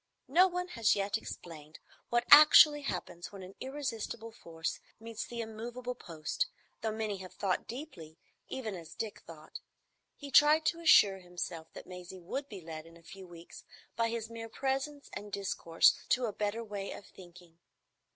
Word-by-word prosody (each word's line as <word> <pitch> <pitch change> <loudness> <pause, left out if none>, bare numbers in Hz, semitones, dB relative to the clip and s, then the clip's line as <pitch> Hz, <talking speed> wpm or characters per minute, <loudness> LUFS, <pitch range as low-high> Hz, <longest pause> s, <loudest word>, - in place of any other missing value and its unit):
No 345 +8 +6
one 360 0 -3
has 225 -8 +2
yet 200 +1 -1
explained 155 -7 -8 0.3
what 240 0 +1
actually 300 0 +9
happens 180 -8 -5
when 195 -2 -9
an 185 +1 -10
irresistible 235 -5 -4
force 165 -7 -5 0.2
meets 225 0 -6
the 235 -1 -5
immovable 235 +3 -5
post, 170 - -3 0.3
though 220 - -1
many 215 -2 -3
have 185 -1 -10
thought 195 -3 -1
deeply, 190 - -8 0.3
even 230 -6 -4
as 170 -4 -9
Dick 220 -2 -5
thought. 155 -2 -10 0.6
He 285 -1 -9
tried 300 +3 +6
to 335 - +1
assure 205 -12 +6
himself 175 -2 -6
that - - -9
Maisie 180 +1 -9
would 270 +11 -5
be 200 -4 -8
led 160 -1 -8
in 165 0 -15
a 170 - -20
few 190 +2 -11
weeks 170 -1 -12 0.3
by 230 0 +1
his 230 -1 -3
mere 225 0 -8
presence 270 +4 -2
and 205 0 -7
discourse 185 -4 +3
to 255 -1 +3
a 215 - -3
better 210 +3 -2
way 205 -3 -5
of 200 - -10
thinking. 175 -2 -16
215 Hz, 170 wpm, -32 LUFS, 175-250 Hz, 0.6 s, actually